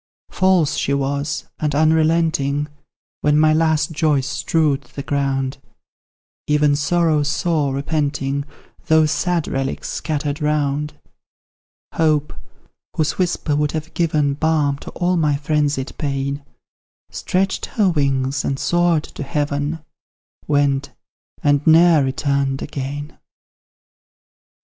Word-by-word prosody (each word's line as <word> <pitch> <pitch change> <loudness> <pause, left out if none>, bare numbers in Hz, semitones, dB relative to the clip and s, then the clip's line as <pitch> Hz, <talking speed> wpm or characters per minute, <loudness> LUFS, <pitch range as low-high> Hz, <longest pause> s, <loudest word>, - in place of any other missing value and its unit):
False 185 -5 +2
she 140 - 0
was, 140 +1 -2
and 150 -2 -1
unrelenting; 155 -2 +2 0.5
When 150 0 +3
my 155 0 +5
last 160 +1 +2
joys 150 -4 +1
strewed 145 0 0
the 140 - -4
ground, 135 -2 -1 0.9
Even 150 -1 +3
Sorrow 155 +1 +2
saw, 150 0 0
repenting, 140 0 -1 0.4
Those 160 -1 +4
sad 170 +2 0
relics 135 0 -3
scattered 150 -1 -3
round; 150 0 0 1.0
Hope, 155 -2 +1 0.6
whose 155 +2 -1
whisper 170 -4 0
would 150 0 0
have 160 +1 -5
given 155 -4 +1
Balm 145 -2 +1
to - - -9
all 180 +1 0
my 150 -3 +2
frenzied 145 -2 -1
pain, 140 0 -2 0.7
Stretched 190 +1 -1
her 210 -4 +1
wings, 135 -4 0
and 135 - -1
soared 175 0 +2
to - - -10
heaven, 145 +2 -2 0.6
Went, 140 -1 +1 0.5
and 145 -1 +3
ne'er 165 -1 +6
returned 135 0 -1
again! 145 +2 -6
150 Hz, 110 wpm, -20 LUFS, 140-160 Hz, 1.0 s, ne'er